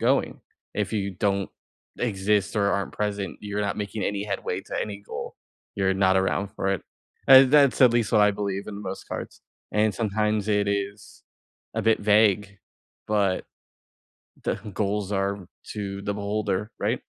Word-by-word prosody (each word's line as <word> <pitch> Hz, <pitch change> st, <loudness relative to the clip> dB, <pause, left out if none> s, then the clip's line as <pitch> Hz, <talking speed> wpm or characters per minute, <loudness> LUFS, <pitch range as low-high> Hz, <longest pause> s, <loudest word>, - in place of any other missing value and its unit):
going. 130 Hz, +4 st, +1 dB, 0.3 s
If -, -, -1 dB
you 100 Hz, -2 st, -1 dB
don't 100 Hz, +1 st, 0 dB, 0.5 s
exist 105 Hz, -3 st, +1 dB
or 100 Hz, -1 st, +3 dB
aren't 100 Hz, -1 st, -1 dB
present, 105 Hz, -2 st, -3 dB
you're 105 Hz, 0 st, -3 dB
not 100 Hz, -1 st, -1 dB
making 105 Hz, 0 st, -4 dB
any 100 Hz, 0 st, -1 dB
headway 95 Hz, -2 st, -3 dB
to -, -, -5 dB
any 100 Hz, -2 st, -4 dB
goal. 100 Hz, -, -7 dB, 0.4 s
You're 95 Hz, -1 st, +2 dB
not 95 Hz, 0 st, +3 dB
around 95 Hz, +1 st, +1 dB
for 95 Hz, -, -1 dB
it. 95 Hz, -, -3 dB, 0.5 s
Uh, 135 Hz, 0 st, +11 dB
that's 140 Hz, 0 st, +4 dB
at 125 Hz, -3 st, +7 dB
least 120 Hz, -2 st, +1 dB
what 105 Hz, -2 st, +5 dB
I 105 Hz, 0 st, +5 dB
believe 100 Hz, -1 st, -3 dB
in 105 Hz, -, -6 dB
the 100 Hz, -, -7 dB
most 95 Hz, 0 st, -6 dB
cards. -, -, -6 dB, 0.3 s
And 105 Hz, 0 st, +2 dB
sometimes 105 Hz, -1 st, 0 dB
it 105 Hz, -1 st, +2 dB
is 100 Hz, 0 st, -4 dB, 0.5 s
a -, -, 0 dB
bit 115 Hz, 0 st, +3 dB
vague, 105 Hz, -1 st, +3 dB, 0.5 s
but 100 Hz, -3 st, +1 dB, 1.0 s
the -, -, +1 dB, 0.2 s
goals 100 Hz, 0 st, -1 dB
are 100 Hz, -2 st, -1 dB, 0.3 s
to 100 Hz, -2 st, -4 dB
the 100 Hz, 0 st, -2 dB
beholder. 105 Hz, 0 st, -2 dB
Right? -, -, -1 dB
100 Hz, 165 wpm, -25 LUFS, 100-105 Hz, 1.0 s, Uh